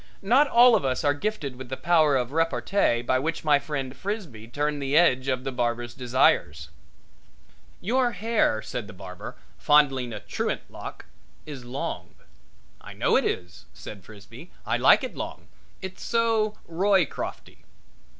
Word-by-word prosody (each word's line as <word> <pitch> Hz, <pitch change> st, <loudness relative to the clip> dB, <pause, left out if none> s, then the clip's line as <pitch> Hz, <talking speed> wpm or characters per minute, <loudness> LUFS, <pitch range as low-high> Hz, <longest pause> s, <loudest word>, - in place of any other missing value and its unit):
Not 255 Hz, +9 st, +4 dB
all 245 Hz, -1 st, +6 dB
of -, -, +1 dB
us 130 Hz, +1 st, -1 dB
are 145 Hz, -1 st, +3 dB
gifted 145 Hz, -6 st, -4 dB
with 130 Hz, -1 st, -9 dB
the 130 Hz, -, -4 dB
power 160 Hz, -4 st, +3 dB
of 125 Hz, 0 st, -2 dB
repartee 165 Hz, -4 st, +1 dB
by 130 Hz, +1 st, +1 dB
which 160 Hz, +4 st, -3 dB
my 150 Hz, -2 st, +4 dB
friend 135 Hz, -3 st, -5 dB
Frisbee 170 Hz, -, -6 dB
turned 145 Hz, +3 st, -2 dB
the 140 Hz, +2 st, +1 dB
edge 130 Hz, -6 st, +4 dB
of 130 Hz, -1 st, -1 dB
the 135 Hz, -, -3 dB
barber's 120 Hz, -1 st, -2 dB
desires. 120 Hz, -, +1 dB, 1.1 s
"Your 240 Hz, +4 st, +1 dB
hair," 215 Hz, -, 0 dB
said 120 Hz, -4 st, -5 dB
the 105 Hz, -, -11 dB
barber, 90 Hz, -1 st, -9 dB, 0.2 s
fondling 135 Hz, -5 st, +3 dB
a 105 Hz, -, -5 dB
truant 105 Hz, -, -3 dB
lock, -, -, -9 dB, 0.4 s
"is 140 Hz, -5 st, -9 dB
long." 125 Hz, +3 st, -5 dB, 0.7 s
"I -, -, -10 dB
know -, -, +1 dB
it -, -, +3 dB
is," 90 Hz, -1 st, -4 dB
said 100 Hz, -3 st, -10 dB
Frisbee. 110 Hz, -, -13 dB, 0.2 s
"I -, -, 0 dB
like -, -, +5 dB
it -, -, -5 dB
long. -, -, -7 dB, 0.3 s
It's 190 Hz, 0 st, -7 dB
so 225 Hz, -2 st, +1 dB
Roycrofty." 185 Hz, -1 st, -1 dB
140 Hz, 155 wpm, -25 LUFS, 120-180 Hz, 1.1 s, all